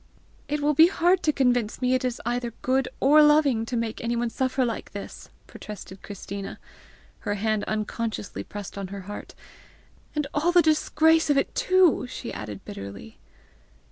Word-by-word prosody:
"It 295 +1 -2
will 295 +1 +2
be 320 +3 +7
hard 355 0 +2
to 305 - +2
convince 245 -6 +1
me 255 0 +1
it 255 +1 +1
is 250 -2 -2
either 240 -1 -2
good 260 0 +2
or 295 +3 +6
loving 295 -7 +4
to 245 - -2
make 230 -1 -3
anyone 235 0 -1
suffer 260 +1 0
like 230 -4 -4
this!" 200 - -8 0.2
protested 195 -2 -10
Christina, 200 0 -7 0.6
her 205 - -2
hand 215 0 0
unconsciously 215 0 -3
pressed 205 -1 -8
on 195 - -4
her 200 +1 -7
heart; 205 +2 -9 0.4
" - - -31
and 300 -1 0
all 315 +4 +2
the 350 -1 +6
disgrace 320 0 +3
of 290 - +4
it 275 - 0
too!" 370 -8 +3
she 250 - -6
added 105 -2 -7
bitterly. 100 -7 -9
245 Hz, 170 wpm, -25 LUFS, 210-295 Hz, 0.6 s, be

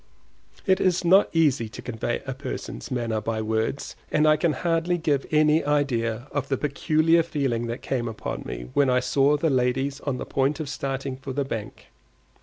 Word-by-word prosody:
It 190 -1 +3
is 180 -1 +2
not 190 +4 +6
easy 145 -9 +2
to - - -11
convey 120 0 -3
a 135 - -3
person's 135 +3 -6
manner 115 -4 -1
by 110 +1 -2
words, 110 +5 -2 0.2
and 155 0 +3
I 155 - +6
can 155 0 +1
hardly 170 +3 0
give 150 -4 0
any 155 +1 +4
idea 130 -5 0
of 140 -2 -2
the 135 - +1
peculiar 155 +3 +2
feeling 135 -8 -1
that 115 +2 -5
came 120 -3 -1
upon 110 -1 -5
me - - -7
when 140 -2 +3
I 125 0 +4
saw 135 +3 +2
the 155 +1 +1
ladies 130 +2 0
on 140 -3 -3
the - - -5
point 140 +3 0
of 155 -3 -4
starting 135 0 -3
for 135 0 -6
the 140 +1 -1
bank. 115 -5 -6
135 Hz, 190 wpm, -25 LUFS, 125-155 Hz, 0.2 s, not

